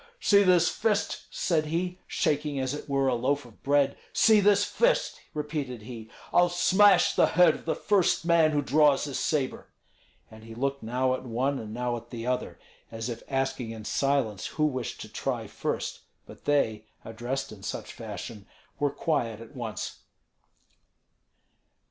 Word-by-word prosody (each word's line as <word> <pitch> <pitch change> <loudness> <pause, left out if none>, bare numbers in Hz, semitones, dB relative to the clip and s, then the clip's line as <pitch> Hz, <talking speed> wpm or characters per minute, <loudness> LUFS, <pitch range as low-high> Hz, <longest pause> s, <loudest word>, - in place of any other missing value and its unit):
"See 200 -1 +5
this 180 -3 +5
fist!" 210 -2 -1
said 160 -4 0
he, 180 +3 -2
shaking 145 -1 0
as 130 0 -1
it 150 - -7
were 135 -1 +1
a 130 - +2
loaf 130 +3 0
of 115 -3 -17
bread; 140 0 +2 0.2
"see 220 -2 +5
this 205 0 +4
fist!" - - +1 0.2
repeated 145 -6 -4
he. 110 -1 -9 0.2
"I'll 175 0 +5
smash 185 +1 +5
the - - +4
head 175 -2 +5
of - - -10
the 160 - 0
first 195 -4 +2
man 170 -2 +5
who 145 -1 0
draws 145 0 +4
his 140 -3 -3
sabre." 140 -4 -1 0.6
And 110 0 -13
he 115 0 -10
looked 140 +3 -2
now 125 +3 0
at 130 - -3
one 130 +3 -1
and 110 -1 -7
now 120 +1 -2
at 115 - -12
the 115 -2 -6
other, 125 0 -2 0.3
as 115 +1 -4
if 115 -1 -5
asking 135 -3 -1
in 110 -2 -8
silence 135 -9 0
who 155 - 0
wished 130 -5 -3
to - - -7
try - - -3
first; - - -3 0.3
but - - -14
they, 110 -7 +1 0.2
addressed 120 +4 -4
in 105 -3 -11
such - - -5
fashion, 105 -4 -8 0.3
were 145 -1 +2
quiet 135 -8 -1
at 115 +4 -12
once. 115 -4 -5
140 Hz, 165 wpm, -27 LUFS, 120-160 Hz, 0.6 s, See